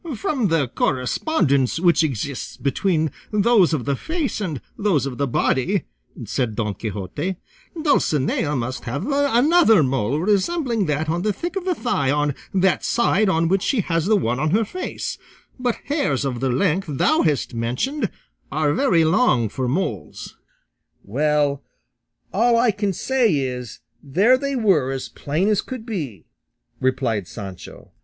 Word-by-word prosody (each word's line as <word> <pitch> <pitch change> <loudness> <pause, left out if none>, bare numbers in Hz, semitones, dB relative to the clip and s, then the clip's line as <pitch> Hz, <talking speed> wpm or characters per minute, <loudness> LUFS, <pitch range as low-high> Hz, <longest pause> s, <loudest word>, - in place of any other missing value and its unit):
"From 230 +1 0
the 160 -6 +1
correspondence 135 - 0
which 170 -2 +4
exists 135 -3 -3
between 155 +4 0 0.2
those 210 -3 +4
of 150 -7 -1
the 140 -1 0
face 320 - -3
and 160 -9 -3 0.2
those 195 -10 +1
of 135 -2 -5
the 140 - +1
body," 130 +1 +1 0.4
said 120 -5 -2
Don 105 -2 -1
Quixote, 105 - -4 0.4
"Dulcinea 150 - +1
must 130 0 -3
have 140 - -3
another 280 - +4
mole 130 +1 0
resembling 215 - +1
that 150 +1 -1
on 170 +2 -1
the 210 +2 +1
thick 345 - -5
of 380 -2 -3
the 365 -2 +1
thigh 145 - 0
on 145 0 +1 0.2
that 190 -1 +2
side 215 -3 +2
on 165 -2 +2
which 190 +2 +2
she 230 +3 +1
has 165 -1 -1
the 215 0 +4
one 125 - -1
on 155 - +1
her 215 +6 +2
face; 365 - -5 0.4
but 245 -2 0
hairs 280 - 0
of 125 -3 -2
the 135 +1 0
length 170 +8 +1
thou 290 - +2
hast 150 -5 0
mentioned 125 - -1 0.4
are 150 -2 +1
very 170 - +3
long 155 - +3
for 130 +4 -3
moles." 125 - -3 0.7
"Well, 145 +4 +1 0.7
all 230 +4 +3
I 235 -1 +4
can 205 0 -1
say 235 0 +1
is 125 -4 -4 0.2
there 195 - +3
they 280 0 -2
were 190 - +2
as 135 -1 -4
plain 155 +7 -1
as 210 -2 +2
could 255 -4 -7
be," 150 - -5 0.5
replied 125 -7 0
Sancho. 95 -3 -9
160 Hz, 155 wpm, -22 LUFS, 135-220 Hz, 0.7 s, which